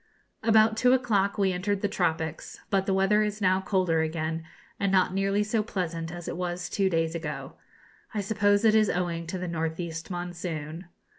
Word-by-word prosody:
About 220 0 +4
two 250 +2 +5
o'clock 210 -6 +1
we 195 -2 +2
entered 195 +2 -1
the 205 - +2
tropics; 160 -4 -2
but 195 -1 +1
the 195 - +2
weather 195 +2 +3
is 210 0 -1
now 185 -1 +3
colder 185 -4 +1
again, 160 0 -2 0.4
and 200 -1 +1
not 185 -1 +3
nearly 195 +1 +1
so 215 +1 0
pleasant 170 -6 -3
as 175 -1 -7
it - - -4
was 180 0 -3
two 195 -1 +2
days 165 -2 0
ago. 160 -3 -5 0.6
I 210 - -2
suppose 205 +1 +2
it 220 - +6
is 215 -1 +4
owing 170 -2 -2
to 185 - -3
the 180 0 -4
north 160 -1 -2
east 165 0 -5
monsoon. 175 -2 -5
185 Hz, 190 wpm, -27 LUFS, 165-205 Hz, 0.6 s, it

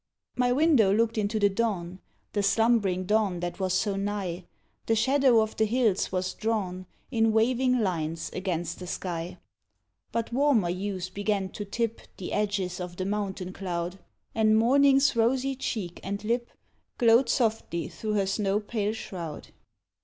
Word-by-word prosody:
My 250 0 +2
window 270 -7 +4
looked 225 +2 +2
into 215 0 0
the 205 - +5
dawn, 195 -4 -2 0.3
The 205 - +1
slumbering 200 -3 +2
dawn 205 -3 +1
that 175 +2 -4
was 185 -1 0
so 205 -2 +1
nigh, 195 -3 -3 0.4
The 225 - +3
shadow 260 0 +4
of 220 0 -2
the 220 - +3
hills 220 -3 +1
was 185 0 -1
drawn 190 -5 -2 0.2
In 225 -2 +3
waving 250 +3 +3
lines 165 -4 -2
against 175 -3 -3
the 180 - -7
sky. 175 -1 -4 0.7
But 230 0 -2
warmer 255 -9 +3
hues 185 0 -4
began 200 -1 -1
to 205 - -6
tip 230 +2 -2 0.2
The 185 - -5
edges 200 -4 -1
of 180 -1 -6
the 185 - -2
mountain 195 -2 -3
cloud 180 -1 -4 0.3
And 220 -1 +4
morning's 275 +4 +4
rosy 260 +4 +1
cheek 205 -9 -4
and 200 +2 -4
lip 235 +2 -1 0.5
Glowed 235 +2 +5
softly 220 -8 0
through 215 -1 -4
her 200 -2 +2
snow 195 +1 0
pale 210 -1 -2
shroud. 170 -8 -7
205 Hz, 155 wpm, -27 LUFS, 185-230 Hz, 0.7 s, the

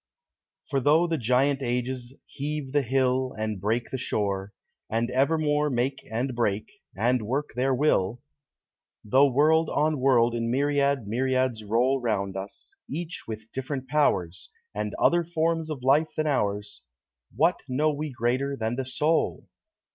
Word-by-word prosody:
For 140 - 0
tho' 150 +6 +4
the 165 -3 -1
Giant 130 +4 +2
Ages 125 +1 -3
heave 145 -1 -5
the 145 +1 +3
hill 130 0 +1
And 110 -3 -3
break 115 +4 -1
the 130 - -3
shore, 100 -4 -2 0.4
and 115 +2 -1
evermore 150 +2 +2
Make 130 +1 -1
and 125 +4 -1
break, 110 -3 0 0.3
and 120 +4 +2
work 135 +7 -2
their 130 +2 +1
will; 120 -6 +1 0.9
Tho' 135 +6 +5
world 155 +4 +3
on 150 0 +1
world 120 -3 +4
in 115 0 -1
myriad 140 -1 +1
myriads 130 0 0
roll 125 +6 +1
Round 100 -5 -1
us, 95 +1 -7 0.2
each 170 +3 -5
with 110 0 -7
different 130 0 -4
powers, 95 - 0 0.2
And - - -3
other 175 0 +4
forms 165 -1 -1
of 140 -5 -5
life 145 +4 +3
than 155 - +1
ours, 105 -7 -1 0.5
What 170 +4 +3
know 150 +4 +1
we 150 +1 -4
greater 130 +3 -1
than 115 +1 -2
the 135 - -2
soul? 150 +5 0
130 Hz, 145 wpm, -26 LUFS, 115-145 Hz, 0.9 s, Tho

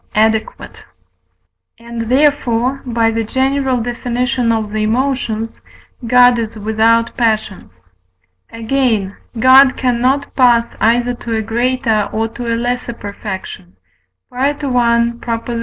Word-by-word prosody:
adequate; 220 +1 -1 0.9
and 230 -1 -6
therefore 265 -2 +1
(by 230 -1 +1
the 225 0 -1
general 265 +2 0
Def. 240 0 -6
of 240 -3 -1
the 215 0 -2
Emotions) 225 -1 -2 0.5
God 245 0 +5
is 225 0 -4
without 220 +2 +1
passions. 215 - -2 0.7
Again, 230 -4 -1 0.2
God 260 +3 +6
cannot 255 +2 0
pass 240 -3 +3
either 240 +2 +2
to 235 -1 -5
a 220 - -1
greater 230 -2 0
or 225 +1 -1
to 235 +1 -5
a 230 - 0
lesser 245 0 -3
perfection 200 - -8 0.6
(I. 275 +4 0
235 Hz, 110 wpm, -16 LUFS, 220-250 Hz, 0.9 s, God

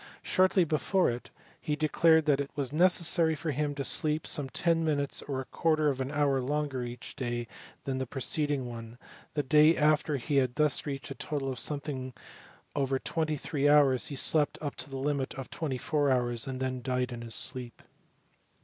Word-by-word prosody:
Shortly 185 0 +3
before 165 +2 +1
it, 120 +1 -7 0.3
he 150 - -1
declared 160 +1 +3
that 145 -2 +3
it 140 0 -2
was 140 -1 -3
necessary 170 -1 +3
for 155 +2 -3
him 145 +1 -1
to 140 - -3
sleep 155 +2 +1
some 145 -4 0
ten 165 +3 +1
minutes 145 -3 0
or 135 -2 -4
a 130 - -5
quarter 155 0 +1
of 135 -2 -2
an 130 - -2
hour 145 -2 +1
longer 140 -1 -2
each 120 0 -7
day 120 -3 -3 0.4
than 130 -1 -2
the 130 - -3
preceding 145 +1 -1
one: 115 -1 -8 0.4
the 145 - +1
day 150 +4 +5
after 150 -1 +2
he 140 +3 -1
had 130 -2 +2
thus 150 -1 +1
reached 135 -4 -5
a - - -2
total 140 -3 -3
of 125 - -5
something 135 -2 -3 0.6
over 135 -2 +1
twenty 155 +2 -2
three 145 -1 0
hours 140 -4 +4
he 145 - -6
slept 150 +2 +2
up 145 -2 -4
to - - -5
the 135 - -5
limit 140 -1 -2
of 135 -1 -7
twenty 145 -6 -3
four 145 +3 0
hours, 120 -2 0
and 130 -1 -4
then 130 -1 -2
died 125 0 -1
in 120 -1 -6
his 115 -1 -5
sleep. 125 -3 -3
140 Hz, 195 wpm, -30 LUFS, 130-150 Hz, 0.6 s, day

